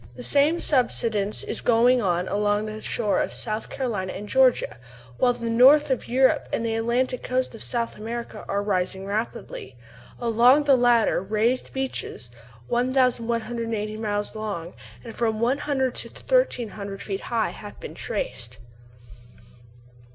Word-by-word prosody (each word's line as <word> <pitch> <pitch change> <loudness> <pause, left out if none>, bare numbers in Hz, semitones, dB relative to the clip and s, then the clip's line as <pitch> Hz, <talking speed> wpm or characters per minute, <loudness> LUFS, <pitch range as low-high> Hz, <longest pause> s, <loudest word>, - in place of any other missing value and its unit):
The - - -7
same 295 +4 +3
subsidence 225 -8 +1
is - - -2
going 245 +1 +4
on 180 -2 0
along 205 +1 0
the 215 0 -6
shore 215 -2 0
of - - -2
South 215 -1 -4
Carolina 215 -9 -3
and 210 - -7
Georgia, 260 - +3 0.4
while 245 -1 +4
the 240 -1 -5
north 270 +6 +6
of 260 - -1
Europe 260 +2 +2
and 230 - -1
the 225 - -1
Atlantic 240 +3 0
coast 255 0 -1
of 225 - -10
South 235 -1 -2
America 225 0 -6
are 200 0 0
rising 190 -1 -1
rapidly. 200 - -4 0.4
Along 240 +5 +4
the 280 -2 +5
latter 240 -5 +3
raised 220 +6 0
beaches, 260 - -5 0.4
1180 235 -3 0
miles 205 -1 -2
long 200 -6 -5 0.3
and 230 -2 -9
from 220 -2 0
100 265 +1 0
to - - -6
1300 225 - -1
feet 195 -2 -4
high, 230 -2 -1
have 205 - -11
been - - -8
traced. 120 0 -5
230 Hz, 140 wpm, -24 LUFS, 210-255 Hz, 0.4 s, north